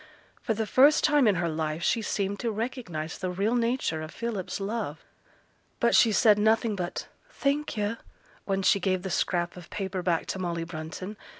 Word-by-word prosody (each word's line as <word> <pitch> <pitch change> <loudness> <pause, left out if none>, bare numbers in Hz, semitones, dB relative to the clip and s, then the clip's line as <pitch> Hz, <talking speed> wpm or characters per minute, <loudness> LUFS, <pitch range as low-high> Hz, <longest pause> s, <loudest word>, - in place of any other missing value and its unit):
For 220 - -1
the 220 +1 -1
first 275 +8 +5
time 295 -4 +4
in 205 - +4
her 175 -1 0
life 155 0 -2
she 230 - +2
seemed 200 -1 -2
to 235 - -1
recognize 210 - -4
the 185 - -2
real 200 +5 0
nature 235 -9 0
of 155 - -6
Philip's 215 -2 -4
love. 200 -6 -4 0.7
But - - +3
she 230 - +6
said 210 0 +5
nothing 220 0 +2
but 180 -2 -4 0.2
'Thank 290 - -1
yo',' 210 +2 -1 0.5
when 195 -1 -1
she 200 - +4
gave 185 -1 0
the 190 - -4
scrap 175 -1 0
of 175 -2 -11
paper 190 -2 -3
back 175 -2 0
to 190 - -6
Molly 170 -2 -2
Brunton. 165 +5 -7
195 Hz, 185 wpm, -27 LUFS, 175-225 Hz, 0.7 s, she